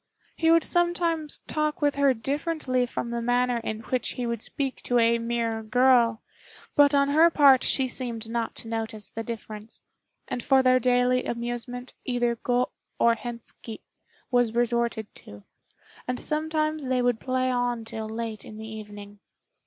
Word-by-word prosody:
He 325 Hz, -, +2 dB
would 330 Hz, 0 st, +5 dB
sometimes 345 Hz, -3 st, +1 dB
talk 305 Hz, -1 st, -1 dB
with 290 Hz, -1 st, +2 dB
her 280 Hz, -1 st, +3 dB
differently 270 Hz, 0 st, -1 dB
from 235 Hz, 0 st, -4 dB
the 235 Hz, 0 st, -2 dB
manner 245 Hz, +1 st, +1 dB
in 220 Hz, -1 st, -4 dB
which 250 Hz, +1 st, -2 dB
he 250 Hz, -, -3 dB
would 235 Hz, -2 st, -3 dB
speak 270 Hz, +1 st, -4 dB
to 245 Hz, -, 0 dB
a 235 Hz, 0 st, +4 dB
mere 230 Hz, -1 st, -1 dB
girl; 235 Hz, 0 st, +3 dB, 0.5 s
but 290 Hz, 0 st, +5 dB
on 280 Hz, 0 st, +3 dB
her 315 Hz, +4 st, +6 dB
part 280 Hz, -5 st, +6 dB
she 265 Hz, -1 st, +3 dB
seemed 235 Hz, -3 st, -3 dB
not 230 Hz, 0 st, -3 dB
to -, -, -3 dB
notice 220 Hz, -2 st, -4 dB
the 225 Hz, -, -5 dB
difference, 220 Hz, -1 st, -8 dB, 0.5 s
and 245 Hz, -, -3 dB
for 265 Hz, +1 st, +4 dB
their 255 Hz, 0 st, +5 dB
daily 250 Hz, +1 st, +2 dB
amusement 240 Hz, +1 st, -4 dB
either 240 Hz, -1 st, 0 dB
Go 245 Hz, +2 st, 0 dB, 0.3 s
or 235 Hz, -, +4 dB
Hentski 235 Hz, -1 st, -8 dB, 0.5 s
was 245 Hz, -2 st, +2 dB
resorted 235 Hz, -2 st, +1 dB
to, 100 Hz, 0 st, -13 dB, 0.6 s
and 250 Hz, 0 st, -2 dB
sometimes 310 Hz, -1 st, -1 dB
they 255 Hz, -1 st, +1 dB
would 245 Hz, -2 st, +1 dB
play 255 Hz, 0 st, 0 dB
on 245 Hz, -2 st, -1 dB
till 220 Hz, -1 st, -6 dB
late 225 Hz, -1 st, -5 dB
in 215 Hz, -, -11 dB
the 220 Hz, -, -7 dB
evening. 205 Hz, -2 st, -9 dB
245 Hz, 160 wpm, -26 LUFS, 230-265 Hz, 0.6 s, her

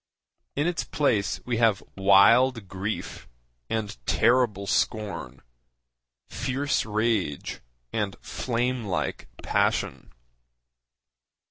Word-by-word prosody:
In 145 Hz, -, +1 dB
its 175 Hz, -1 st, 0 dB
place 115 Hz, -9 st, 0 dB
we 120 Hz, -2 st, -1 dB
have 110 Hz, -4 st, +3 dB
wild 100 Hz, +4 st, +5 dB
grief 95 Hz, +4 st, -5 dB, 0.4 s
and 110 Hz, -2 st, -2 dB
terrible 115 Hz, -4 st, +3 dB
scorn, 95 Hz, -, -2 dB, 0.8 s
fierce 135 Hz, -1 st, -1 dB
rage 105 Hz, -8 st, -1 dB, 0.3 s
and 105 Hz, -3 st, -1 dB
flame 125 Hz, 0 st, -1 dB
like 95 Hz, -8 st, -3 dB, 0.2 s
passion. -, -, 0 dB
110 Hz, 85 wpm, -26 LUFS, 100-125 Hz, 0.8 s, wild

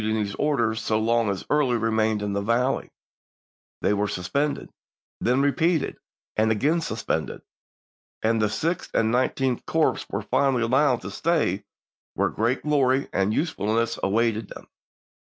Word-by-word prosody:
ing 110 Hz, +1 st, 0 dB
these 105 Hz, -2 st, -2 dB
orders, 120 Hz, -7 st, +1 dB
so 110 Hz, -, 0 dB
long 115 Hz, 0 st, +2 dB
as 95 Hz, -2 st, -3 dB
Early 140 Hz, -5 st, +2 dB
remained 110 Hz, -1 st, +1 dB
in 100 Hz, -1 st, -2 dB
the 100 Hz, -, -1 dB
valley; 120 Hz, +5 st, 0 dB, 0.9 s
they 105 Hz, -, +3 dB
were 105 Hz, 0 st, 0 dB
suspended, 140 Hz, +12 st, -2 dB, 0.5 s
then 125 Hz, +3 st, +2 dB
repeated 160 Hz, +3 st, +1 dB, 0.4 s
and 110 Hz, +1 st, +2 dB
again 150 Hz, +10 st, +1 dB
suspended, 110 Hz, -8 st, -3 dB, 0.8 s
and 110 Hz, 0 st, +2 dB
the 105 Hz, -, +2 dB
Sixth 165 Hz, +11 st, -2 dB
and 110 Hz, 0 st, +2 dB
Nineteenth 130 Hz, 0 st, 0 dB
Corps -, -, +1 dB
were -, -, -3 dB
finally 135 Hz, -4 st, +1 dB
allowed 130 Hz, +1 st, +2 dB
to 95 Hz, -, -7 dB
stay 105 Hz, -, 0 dB, 0.5 s
where -, -, +1 dB
great 115 Hz, +4 st, -1 dB
glory 140 Hz, -3 st, +2 dB
and 95 Hz, +1 st, +1 dB
usefulness 115 Hz, -, 0 dB
awaited 110 Hz, +1 st, +1 dB
them. -, -, -12 dB
115 Hz, 145 wpm, -25 LUFS, 110-135 Hz, 0.9 s, they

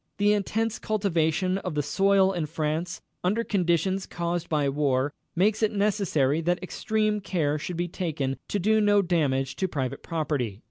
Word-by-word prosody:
The 205 Hz, +1 st, +4 dB
intense 215 Hz, +2 st, -1 dB
cultivation 185 Hz, -3 st, 0 dB
of 180 Hz, -5 st, -5 dB
the 150 Hz, -, +1 dB
soil 195 Hz, +5 st, +3 dB
in 170 Hz, -4 st, -2 dB
France, 160 Hz, +2 st, -2 dB, 0.2 s
under 210 Hz, +6 st, +1 dB
conditions 190 Hz, -1 st, 0 dB
caused 170 Hz, 0 st, -3 dB
by 150 Hz, -2 st, +1 dB
the 140 Hz, -, +1 dB
war, 140 Hz, -1 st, +1 dB, 0.2 s
makes 205 Hz, +5 st, +2 dB
it 215 Hz, -, +3 dB
necessary 190 Hz, -8 st, +1 dB
that 175 Hz, +2 st, 0 dB
extreme 215 Hz, +2 st, 0 dB
care 155 Hz, -6 st, 0 dB
should 175 Hz, +3 st, -5 dB
be 175 Hz, +1 st, -1 dB
taken 155 Hz, -7 st, -2 dB
to -, -, -1 dB
do 215 Hz, +3 st, +3 dB
no 205 Hz, -1 st, +4 dB
damage 140 Hz, -7 st, 0 dB
to 190 Hz, -, 0 dB
private 135 Hz, -7 st, -3 dB
property. 140 Hz, -10 st, -2 dB
175 Hz, 170 wpm, -26 LUFS, 150-200 Hz, 0.2 s, The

